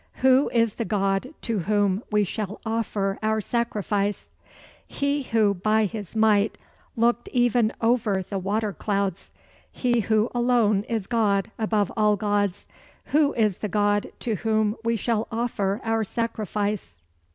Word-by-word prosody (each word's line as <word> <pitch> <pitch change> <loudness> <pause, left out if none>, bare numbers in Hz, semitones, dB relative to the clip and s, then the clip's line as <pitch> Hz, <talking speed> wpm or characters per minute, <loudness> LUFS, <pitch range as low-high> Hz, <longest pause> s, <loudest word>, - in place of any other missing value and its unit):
Who 265 +2 +5
is 230 -3 +2
the 230 - -3
God 195 +3 0
to 225 -3 -1
whom 205 +1 +1
we 210 0 +3
shall 205 +1 -4
offer 215 -3 -1
our 220 0 +1
sacrifice? 210 -2 -2 0.6
"He 280 +1 -1
who 220 -5 +2
by 215 +4 +2
his 210 -1 -6
might 215 -1 +3 0.4
looked 235 +1 +1
even 240 -2 +2
over 225 -5 +1
the 195 - -3
water 205 +2 -1
clouds; 195 +1 -2 0.4
he 240 -2 +1
who 220 +2 +1
alone 240 -4 +2
is 225 -5 -2
God 210 -3 +1
above 215 -2 +1
all 210 -2 +3
gods. 205 -2 -1 0.5
Who 295 -1 +4
is 215 -5 +1
the 210 - -3
God 205 0 +1
to 225 -4 -1
whom 215 +1 +1
we 230 0 +1
shall 225 0 -1
offer 220 -3 -1
our 225 0 0
sacrifice?" 210 - -3
215 Hz, 140 wpm, -25 LUFS, 205-230 Hz, 0.6 s, Who